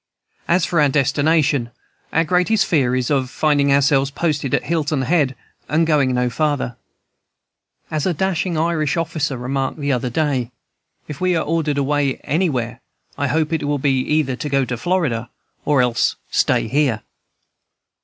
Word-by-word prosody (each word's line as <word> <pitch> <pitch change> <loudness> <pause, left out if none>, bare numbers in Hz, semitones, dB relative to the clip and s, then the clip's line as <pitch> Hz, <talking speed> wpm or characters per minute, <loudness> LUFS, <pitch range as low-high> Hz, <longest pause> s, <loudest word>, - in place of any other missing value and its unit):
"As 170 0 +3
for 165 -3 +1
our 145 - +4
destination, 140 -1 +2 0.4
our 165 - +2
greatest 180 +5 +2
fear 130 -8 +1
is 130 +2 -1
of 135 -3 +1
finding 145 -1 +2
ourselves 140 0 +3
posted 145 -3 -2
at - - -1
Hilton 150 -2 -1
Head 140 -2 +1 0.3
and 160 +2 +2
going 145 -5 +2
no 125 0 +1
farther. 140 -1 -1 1.2
As 155 +1 -1
a 180 - +1
dashing 185 -1 -1
Irish 160 -1 0
officer 160 -5 -2
remarked 135 +3 -2
the 145 -2 -1
other 125 -1 -1
day, 130 -3 -1 0.6
'If 150 +1 -8
we 185 -1 +2
are 165 - 0
ordered 155 -2 0
away 140 -1 +1
anywhere, 140 -7 -1 0.3
I - - -1
hope 160 0 0
it 160 - 0
will 145 0 0
be 135 -1 +1
either 140 -1 0
to 150 - -4
go 135 -1 +2
to 125 - -3
Florida 125 -6 -1 0.4
or 145 -4 +3
else 120 -1 +1 0.2
stay - - +2
here!'" 130 -3 +1
145 Hz, 160 wpm, -20 LUFS, 130-160 Hz, 1.2 s, our